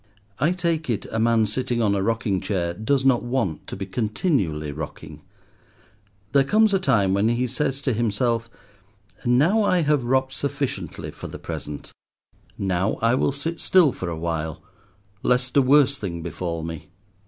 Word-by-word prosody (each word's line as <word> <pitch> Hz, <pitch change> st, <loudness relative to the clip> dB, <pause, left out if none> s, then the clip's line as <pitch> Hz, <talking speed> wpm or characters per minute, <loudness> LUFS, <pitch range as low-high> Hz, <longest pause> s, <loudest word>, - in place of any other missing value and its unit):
I 155 Hz, +5 st, +3 dB
take 170 Hz, -4 st, -1 dB
it, 115 Hz, -, -1 dB
a 115 Hz, -, -1 dB
man 115 Hz, -1 st, +3 dB
sitting 120 Hz, +2 st, -1 dB
on 105 Hz, -3 st, +2 dB
a 100 Hz, -, 0 dB
rocking 105 Hz, -2 st, 0 dB
chair 85 Hz, -4 st, -1 dB
does 130 Hz, +8 st, 0 dB
not 130 Hz, -3 st, +4 dB
want 120 Hz, -, -2 dB
to -, -, -6 dB
be 95 Hz, -, -5 dB
continually 100 Hz, -, -1 dB
rocking. 75 Hz, +1 st, -8 dB, 1.1 s
There 140 Hz, -1 st, +5 dB
comes 215 Hz, +7 st, +3 dB
a 195 Hz, -, +3 dB
time 105 Hz, -, +2 dB
when 100 Hz, +3 st, +2 dB
he 120 Hz, +2 st, +1 dB
says 135 Hz, +2 st, -2 dB
to 130 Hz, -, +1 dB
himself—"Now 115 Hz, -, -1 dB
I 185 Hz, -4 st, +3 dB
have 150 Hz, -3 st, +2 dB
rocked 130 Hz, +2 st, +1 dB
sufficiently 140 Hz, -1 st, -3 dB
for -, -, -8 dB
the -, -, -8 dB
present; 75 Hz, -1 st, -7 dB, 0.7 s
now 95 Hz, +1 st, 0 dB
I 115 Hz, +1 st, +4 dB
will 130 Hz, -, +2 dB
sit 160 Hz, +4 st, -4 dB
still 180 Hz, -7 st, +4 dB
for 90 Hz, -6 st, -5 dB
a 85 Hz, -, -4 dB
while, 80 Hz, -1 st, -3 dB, 0.6 s
lest 125 Hz, 0 st, +1 dB
a 140 Hz, -, +7 dB
worse 140 Hz, +1 st, +5 dB
thing 85 Hz, -7 st, -5 dB
befall 85 Hz, 0 st, -4 dB
me." 80 Hz, 0 st, -7 dB
115 Hz, 165 wpm, -24 LUFS, 95-135 Hz, 1.1 s, a